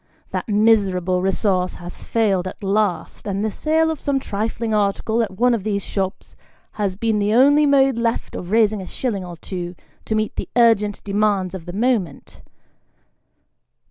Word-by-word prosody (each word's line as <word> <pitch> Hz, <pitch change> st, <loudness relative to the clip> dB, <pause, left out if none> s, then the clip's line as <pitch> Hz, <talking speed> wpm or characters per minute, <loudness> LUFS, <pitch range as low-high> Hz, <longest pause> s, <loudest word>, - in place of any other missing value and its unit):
That -, -, -4 dB
miserable 195 Hz, -4 st, +2 dB
resource 190 Hz, -1 st, 0 dB
has 175 Hz, 0 st, -9 dB
failed 195 Hz, -5 st, +1 dB
at 195 Hz, -, -9 dB
last, 200 Hz, -1 st, -1 dB
and 200 Hz, +1 st, -1 dB
the 220 Hz, -, -1 dB
sale 320 Hz, +6 st, +1 dB
of 315 Hz, -, -5 dB
some 280 Hz, -1 st, 0 dB
trifling 220 Hz, 0 st, -3 dB
article 210 Hz, +2 st, +1 dB
at 225 Hz, -, -1 dB
one 245 Hz, +2 st, +3 dB
of 225 Hz, -5 st, -1 dB
these 200 Hz, -2 st, -1 dB
shops, 190 Hz, -1 st, -4 dB, 0.4 s
has 200 Hz, -3 st, -2 dB
been 220 Hz, +1 st, 0 dB
the 205 Hz, +2 st, +1 dB
only 290 Hz, +4 st, +5 dB
mode 270 Hz, -3 st, +3 dB
left 230 Hz, 0 st, -1 dB
of 175 Hz, -, -6 dB
raising 215 Hz, -1 st, +2 dB
a 185 Hz, -, -8 dB
shilling 210 Hz, -5 st, -3 dB
or 175 Hz, -1 st, -8 dB
two, 175 Hz, +1 st, -6 dB, 0.3 s
to 220 Hz, -, -1 dB
meet 215 Hz, 0 st, -1 dB
the -, -, -4 dB
urgent 220 Hz, -4 st, +3 dB
demands 200 Hz, -2 st, 0 dB
of 180 Hz, -2 st, -8 dB
the 175 Hz, -, -6 dB
moment. 210 Hz, -, -1 dB
210 Hz, 170 wpm, -21 LUFS, 190-230 Hz, 0.4 s, only